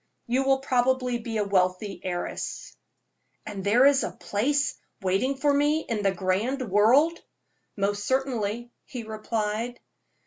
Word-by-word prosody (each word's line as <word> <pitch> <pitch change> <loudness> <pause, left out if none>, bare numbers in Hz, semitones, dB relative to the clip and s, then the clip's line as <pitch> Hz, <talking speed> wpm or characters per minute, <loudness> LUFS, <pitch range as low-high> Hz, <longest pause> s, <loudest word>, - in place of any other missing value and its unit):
You 250 +3 +1
will 270 0 +3
probably 255 -2 +1
be 225 -1 -4
a 210 - +2
wealthy 195 0 0
heiress." 175 -1 -4 0.7
"And 200 -3 -6
there 230 +7 +5
is 280 -1 +5
a - - -1
place 285 +8 0 0.3
waiting 195 +9 +1
for 285 +1 +2
me 295 +2 +2
in 220 -3 -1
the 195 -1 +2
grand 205 +8 -1
world?" 265 - +4 0.6
"Most 205 +1 0
certainly," 240 -3 -1
he 245 -3 -7
replied. 220 +2 -3
235 Hz, 135 wpm, -26 LUFS, 205-265 Hz, 0.7 s, there